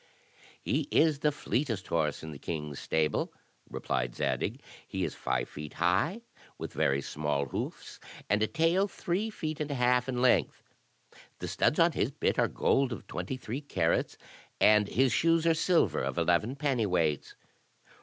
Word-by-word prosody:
"He 145 0 -1
is 155 -3 +3
the 150 +1 +2
fleetest 120 -8 -2
horse 80 -2 0
in 80 - -6
the 70 - -9
king's 75 -4 -5
stable," 80 -1 0 0.4
replied - - -2
Zadig; 70 -4 -1 0.3
"he - - -3
is - - -2
five 65 -1 -2
feet 75 0 -8
high, 95 - +1 0.4
with - - -6
very 70 +1 +1
small 75 -1 -1
hoofs, 65 - -6 0.3
and 105 +1 +2
a 110 - +3
tail 170 - +2
three 195 +3 -2
feet 155 -7 -4
and 150 -1 -2
a 140 - -2
half 125 0 +2
in 125 -1 -1
length; 125 -1 +2 0.7
the - - -5
studs - - +1
on - - +5
his - - 0
bit - - -1
are - - +4
gold 135 -1 +1
of 115 - -6
twenty 90 +8 -4
three 125 +2 -5
carats, 85 - 0 0.4
and 105 -1 +5
his 130 +2 +2
shoes 165 +4 +3
are 165 - +5
silver 160 - +2
of - - -3
eleven 90 +9 +2
penny 135 -6 0
weights." 80 -6 0
115 Hz, 165 wpm, -30 LUFS, -, 0.7 s, on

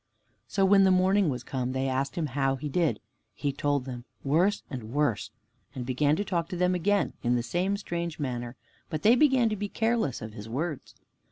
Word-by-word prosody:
So 195 -1 +2
when 195 0 +6
the 190 - +5
morning 185 0 +4
was 125 -2 -3
come, 130 -1 -3
they 130 0 0
asked 135 +1 -1
him 170 - -1
how 135 -1 +1
he 145 +3 -5
did. 165 +1 +1 0.4
He 140 -2 -2
told 145 -1 0
them, 125 -2 -6 0.2
"Worse 175 +9 +2
and 120 -5 -7
worse," 145 -6 0 0.5
and 125 -2 -4
began 145 +4 +2
to 205 - -2
talk 170 -3 -1
to - - -4
them 180 +1 +2
again 195 +3 +1
in 120 0 +2
the 120 - 0
same 180 +11 0
strange 170 -4 -4
manner, 120 -4 -4 0.3
but 155 - -4
they 225 +3 +7
began 260 -3 +4
to 215 - -1
be 205 0 -4
careless 225 - 0
of 110 0 -8
his 105 +1 -9
words. 150 +4 -4
150 Hz, 205 wpm, -28 LUFS, 130-190 Hz, 0.5 s, they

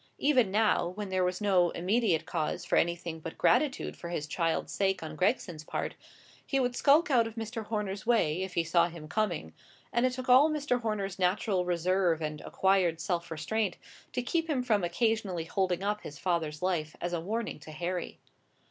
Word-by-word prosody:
Even 255 -8 +3
now, 210 -3 +2
when 200 +3 -5
there 185 -1 +1
was 180 0 0
no 185 -4 +4
immediate 180 -3 +1
cause 160 -2 -2
for - - 0
anything 170 -1 0
but 160 +1 -8
gratitude 270 +1 +2
for 170 - -8
his 155 -3 -3
child's 165 +2 -1
sake 195 -3 0
on 155 0 -6
Gregson's 175 - 0
part, - - -3 0.5
he 275 - 0
would 245 -1 0
skulk 300 +5 +4
out 235 -3 +4
of 225 - -9
Mr. 225 0 -5
Horner's 205 -3 -3
way, 185 -8 +2
if 190 -1 -5
he 170 - +2
saw 170 +1 +3
him 165 -3 -9
coming; 170 - -1 0.4
and 235 - +2
it 255 0 +2
took 255 0 -6
all 260 +5 +7
Mr. 290 -5 0
Horner's 200 -4 -2
natural 185 0 +1
reserve 175 -1 +1
and 155 -1 -4
acquired 190 -4 +2
self 170 0 -2
restraint 190 +7 -1 0.4
to 250 - -1
keep 325 +6 -1
him 265 -5 +1
from 215 -6 +2
occasionally 190 -2 0
holding 185 +1 0
up 210 +1 -1
his 150 - -9
father's 160 -2 -1
life 160 -5 -1
as 175 0 -3
a 170 - -1
warning 220 +1 -3
to 155 - -11
Harry. 175 +3 -4
190 Hz, 190 wpm, -30 LUFS, 170-225 Hz, 0.5 s, all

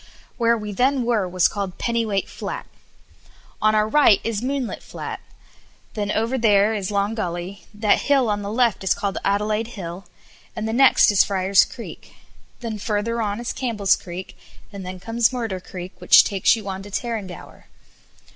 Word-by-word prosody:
Where 235 -1 +3
we 210 -1 -5
then 255 +5 +1
were 225 -6 0
was 180 -1 +3
called 195 -3 -5
Pennyweight 225 -5 -1
Flat. - - -6 1.0
"On 215 0 +3
our 215 0 +3
right 250 -5 +5
is 225 -2 -2
Moonlight 265 -1 -3
Flat; - - -7 0.7
then 205 -2 -3
over 230 +5 0
there 210 -1 +4
is 200 -3 -3
Long 200 +1 0
Gully; 180 -2 -5
that 210 0 +2
hill 275 -4 +2
on 205 -1 -1
the 200 0 -5
left 235 -3 +1
is 190 - +2
called 200 -1 -2
Adelaide 210 +3 -1
Hill; 175 0 -7 0.5
and 215 -1 -3
the 220 - -2
next 265 -3 +6
is 200 - +5
Friar's 195 -1 +3
Creek; - - -11 0.5
then 225 -3 -4
further 220 +3 -1
on 205 0 -2
is 240 - -4
Campbell's 220 -6 +1
Creek; 180 +1 -8 0.4
and 200 -1 -7
then 185 0 -7
comes 230 +4 +1
Murder 225 -7 -3
Creek, 180 0 -9
which - - +7
takes 195 +2 +2
you 215 -3 -8
on 190 0 -4
to 200 - -10
Tarrangower." 205 -4 -6
210 Hz, 170 wpm, -22 LUFS, 195-230 Hz, 1.0 s, which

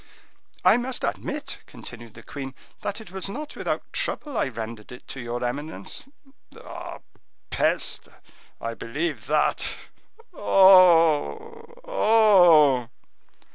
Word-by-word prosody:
"I - - +6
must 250 +1 -3
admit," - - -3
continued 115 -2 -11
the 115 - -13
queen, 135 -2 -8 0.3
"that 205 - -4
it 220 -5 -12
was 190 0 -4
not 300 +8 -7
without - - -3
trouble 300 - -3
I - - +1
rendered 115 -2 -7
it 125 - -12
to 135 - -6
your 120 +1 -4
eminence." 145 +6 -4 0.5
"Ah, - - -9 0.5
peste! - - 0 0.5
I 115 0 -4
believe 145 +7 -4
that. 150 +1 +1 0.6
Oh! 190 - +4 0.2
oh!" 180 - +5
160 Hz, 110 wpm, -24 LUFS, -, 0.6 s, I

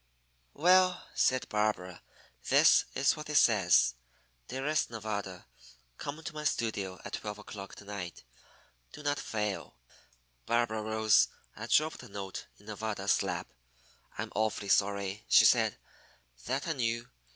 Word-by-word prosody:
"Well," 185 +3 +4
said 130 0 +2
Barbara, 105 -4 -1 0.5
"this - - +6
is 135 +1 +3
what 155 -1 -8
it 150 - -3
says: 95 - +5 0.5
'Dearest 135 +4 -1
Nevada 100 -5 -5 0.5
Come 150 +3 -6
to 170 - -6
my 150 0 -6
studio 100 -9 -1
at - - -8
twelve 105 -1 -4
o'clock 100 -2 -9
to 105 - -13
night. 95 -7 -7 0.7
Do 150 - -10
not 145 0 0
fail.'" 105 -7 -3 0.7
Barbara 115 -2 +1
rose 110 0 +3 0.3
and - - -7
dropped 155 +1 +3
the - - -11
note 100 -1 -6
in 100 - -20
Nevada's 105 -2 -1
lap. - - -4 0.6
"I'm - - -4
awfully 110 -2 -1
sorry," 100 +1 +1
she - - +7
said, - - +4 0.7
"that 135 +5 -1
I 165 - 0
knew. 115 -3 -1
110 Hz, 135 wpm, -31 LUFS, 100-135 Hz, 0.7 s, she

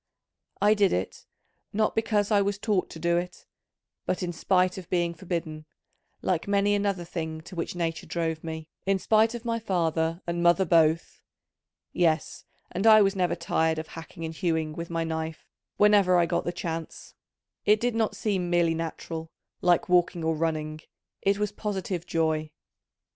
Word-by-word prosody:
I 210 +1 +5
did 205 -2 +3
it, 90 +1 -3 0.5
not 215 +1 +1
because 215 -2 +1
I 205 -1 +5
was 200 0 0
taught 205 -3 0
to - - -9
do 170 +1 +1
it, 180 +1 -5 0.6
but 185 - -1
in 175 -1 -2
spite 185 +2 +1
of 180 - -12
being 175 -2 +1
forbidden, 165 -3 -5 0.6
like 180 -1 0
many 200 0 +2
another 200 -3 0
thing 160 -2 -5
to 180 +3 -11
which 170 +1 -3
nature 165 -2 -3
drove 160 -2 -2
me, 160 -1 -6 0.2
in 195 0 +3
spite 220 +4 +3
of 240 0 -7
my 230 -1 0
father 165 -4 0
and 170 0 -2
mother 175 +2 +4
both. 165 -1 +2 0.7
Yes, 165 -2 0 0.3
and 195 +5 0
I 215 -1 +8
was 195 0 +1
never 180 -3 +1
tired 160 0 0
of 160 0 -5
hacking 165 +1 -8
and 160 - -5
hewing 160 -3 -1
with 170 +1 -6
my 165 -1 -1
knife 160 0 -4 0.3
whenever 205 -3 +5
I 175 - +4
got 170 0 -1
the 175 - 0
chance: 165 -2 -6 0.5
it 210 +1 +4
did 245 +1 0
not 225 -1 0
seem 190 -5 -1
merely 170 -1 +3
natural, 165 0 -5 0.3
like 175 -2 +3
walking 175 -2 +2
or 160 0 +1
running, 155 -1 -2 0.4
it 200 0 +2
was 210 -1 -1
positive 190 -4 -4
joy. 160 -1 0
175 Hz, 170 wpm, -27 LUFS, 160-200 Hz, 0.7 s, I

